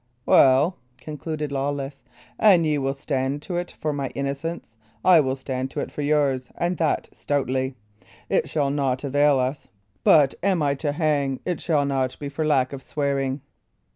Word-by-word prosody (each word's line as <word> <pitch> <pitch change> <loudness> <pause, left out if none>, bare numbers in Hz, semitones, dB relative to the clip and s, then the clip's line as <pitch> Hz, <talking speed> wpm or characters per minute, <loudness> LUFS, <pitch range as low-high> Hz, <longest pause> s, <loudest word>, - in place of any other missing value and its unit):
"Well," 135 +7 +5 0.2
concluded 155 -1 -5
Lawless, 140 0 -3 0.4
"an 190 -6 +6
ye 150 -2 +1
will 135 0 -1
stand 135 +1 -2
to 175 +1 -3
it 175 0 -4
for 155 -1 -1
my 140 -1 -2
innocence, 140 -1 -4 0.3
I 180 -3 +7
will 130 -3 +1
stand 130 -1 -4
to - - -4
it - - -4
for - - -5
yours, 145 -4 +1
and 175 +1 0
that 160 -1 0
stoutly. 130 -2 -1 0.5
It - - 0
shall 145 -3 0
naught 135 -2 -1
avail 145 0 +3
us; 130 +2 -2 0.4
but 145 -4 +5
an 190 -1 +2
I 140 -1 +2
be - - -7
to 145 -3 -1
hang, 145 -4 0
it 180 - -2
shall 150 -4 +1
not 135 -2 -1
be 145 - -5
for 145 +3 -3
lack 140 -4 +2
of 135 - -6
swearing." 140 -1 -2
140 Hz, 175 wpm, -24 LUFS, 135-155 Hz, 0.5 s, I